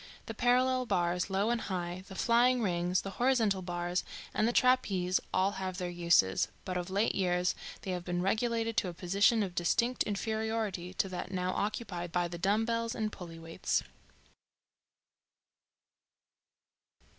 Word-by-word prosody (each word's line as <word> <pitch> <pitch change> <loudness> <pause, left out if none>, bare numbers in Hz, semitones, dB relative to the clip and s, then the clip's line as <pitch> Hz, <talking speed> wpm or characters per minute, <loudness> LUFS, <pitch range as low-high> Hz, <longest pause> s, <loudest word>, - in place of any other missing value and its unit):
The 225 - -5
parallel 255 +2 +2
bars, 175 0 0
low 195 +4 +1
and 240 -1 0
high, 180 -1 -4
the 190 - -10
flying 240 +3 +3
rings, 175 -1 0
the 195 - -5
horizontal 225 -7 +3
bar 175 -1 -3 0.4
and 215 - +2
the - - +2
trapeze 200 -8 +3
all 190 +2 +2
have 185 -1 -3
their 180 -2 -3
uses, 170 - +3 0.2
but 185 - -3
of 180 0 -3
late 200 +4 +1
years 180 -1 +1 0.3
they 190 - -3
have 180 -1 -3
been 175 0 -2
relegated 225 +4 0
to 215 - +2
a 175 - -6
position 200 +6 +3
of 185 -3 -4
distinct 235 +8 +1
inferiority 220 -3 -1
to 195 - +1
that 180 -1 -5
now 185 -1 -1
occupied 185 -5 -3
by 175 0 +1
the 170 0 -7
dumbbells 225 +5 +1
and 215 -2 -1
pulley 170 -4 -9
weights. 165 0 -1
190 Hz, 150 wpm, -31 LUFS, 175-225 Hz, 0.4 s, flying